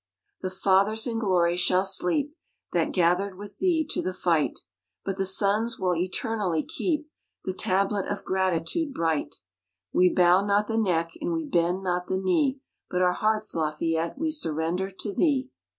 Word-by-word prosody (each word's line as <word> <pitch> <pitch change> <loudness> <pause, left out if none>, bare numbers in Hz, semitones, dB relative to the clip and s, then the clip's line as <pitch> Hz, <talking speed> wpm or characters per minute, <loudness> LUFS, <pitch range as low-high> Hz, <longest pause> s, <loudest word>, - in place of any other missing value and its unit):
_The 185 - -2
Fathers 200 +3 +2
in 230 -2 -2
glory 180 -5 +2
shall 180 +1 +2
sleep, 270 - +2 0.4
That - - +1
gathered 185 +2 +1
with 205 +1 -10
thee 340 -4 +2
to - - 0
the 185 0 -3
fight, 165 -5 0 0.4
But 195 -1 -2
the 195 - 0
Sons 205 +4 +1
will 180 -1 0
eternally 185 -1 -1
keep 305 -4 -2 0.4
The 185 - -2
Tablet 195 +2 0
of 205 - -4
Gratitude 190 - -1
bright. 160 -3 -1 0.6
We 180 0 +5
bow 180 +2 +4
not 205 +1 +2
the 225 +1 -1
neck, 165 -5 +1
and 340 +3 -1
we 325 -1 -2
bend 180 - 0
not 180 -1 -1
the 190 - 0
knee, 260 +9 +1 0.3
But 180 0 +1
our 180 0 +3
hearts, 215 +1 0
Lafayette, 165 - -1
we 320 +2 -1
surrender 175 - -1
to 200 +2 -5
thee. 270 - +1
190 Hz, 165 wpm, -26 LUFS, 180-220 Hz, 0.6 s, We